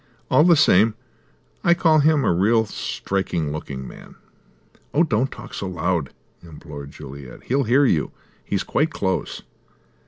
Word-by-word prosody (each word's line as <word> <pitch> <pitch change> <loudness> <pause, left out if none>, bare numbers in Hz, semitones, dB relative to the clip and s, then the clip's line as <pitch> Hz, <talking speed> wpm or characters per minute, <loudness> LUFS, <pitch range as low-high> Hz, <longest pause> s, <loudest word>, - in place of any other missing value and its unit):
All 150 - +6
the 170 0 +6
same 110 - +4 0.7
I 170 - +4
call 160 -2 +4
him 150 -1 +3
a - - +3
real 110 +6 +3
striking 95 -6 -3
looking 70 -3 -6
man." - - -13 0.8
"Oh, 160 - +5
don't 130 -4 0
talk - - -10
so 100 - -4
loud," 90 -4 -1 0.3
implored 75 -4 -10
Juliet. 70 -3 -11
"He'll 135 +2 0
hear 130 +5 +4
you. 80 - +1 0.3
He's - - -2
quite 155 +3 0
close." 95 - -3
100 Hz, 145 wpm, -22 LUFS, -, 0.8 s, All